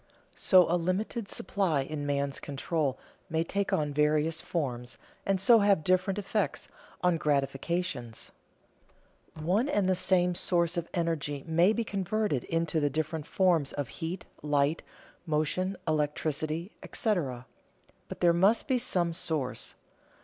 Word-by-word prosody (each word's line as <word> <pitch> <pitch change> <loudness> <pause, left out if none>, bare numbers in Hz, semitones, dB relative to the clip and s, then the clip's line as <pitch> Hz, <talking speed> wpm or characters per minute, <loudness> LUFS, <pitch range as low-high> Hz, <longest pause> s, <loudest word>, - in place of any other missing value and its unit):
So 185 -2 +5
a 175 - +2
limited 200 +5 -2
supply 185 -7 0
in 145 +1 -4
man's 140 -1 0
control 145 0 -2 0.3
may 160 +1 +1
take 200 +4 -2
on 150 -1 0
various 150 +2 +2
forms 125 -7 -3 0.3
and 195 -1 +2
so 225 +5 +7
have 200 -5 +3
different 185 +3 +2
effects 205 0 -2 0.4
on 180 -2 +3
gratifications. 140 -3 -2 1.0
One 185 - 0
and 205 -9 +1
the 190 - +3
same 180 -1 +2
source 175 0 +1
of 170 -1 -3
energy 150 -5 -1
may 170 +4 +4
be 235 +1 0
converted 200 - -1
into 165 -1 0
the 145 -1 +1
different 155 +1 -3
forms 175 -7 +2
of 140 -5 -3
heat, 175 +2 -5 0.2
light, 145 +1 +1 0.5
motion, 165 +5 0
electricity, 155 +3 -1
etc. 140 - -1 0.6
But - - -8
there 170 -1 +5
must 195 +7 +3
be 260 -3 +2
some 175 -8 0
source. 155 -6 -2
165 Hz, 135 wpm, -29 LUFS, 150-185 Hz, 1.0 s, so